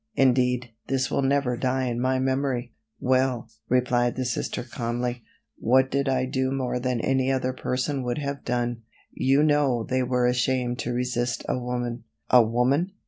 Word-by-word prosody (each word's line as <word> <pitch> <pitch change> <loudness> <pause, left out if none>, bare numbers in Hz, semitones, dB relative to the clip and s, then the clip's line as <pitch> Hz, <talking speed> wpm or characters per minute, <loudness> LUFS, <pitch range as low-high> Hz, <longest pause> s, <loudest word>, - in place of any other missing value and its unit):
Indeed, 125 -3 +2 0.2
this 130 -1 0
will - - +1
never 135 -2 +1
die 130 +1 0
in 120 -2 -1
my 130 +1 +2
memory." 130 -2 -1 0.3
"Well," 130 -2 +1 0.2
replied 120 -1 +2
the 130 - -2
Sister 120 0 -2
calmly, 120 0 -3 0.4
"what 130 +2 +3
did 140 0 +1
I 130 -1 +1
do 130 0 -1
more 130 -2 -1
than 125 -1 -1
any 135 +1 +1
other 130 -1 0
person 130 +2 -2
would 125 -1 -2
have 140 -2 -4
done? 120 -1 -1 0.3
You 135 +3 +3
know 145 -6 +2
they 130 0 +1
were 125 0 +1
ashamed 125 0 +1
to 120 - -2
resist 120 -1 -1
a - - +1
woman." 120 -1 -3 0.3
"A 125 - +8
woman!" 125 - +1
125 Hz, 165 wpm, -25 LUFS, 120-130 Hz, 0.4 s, A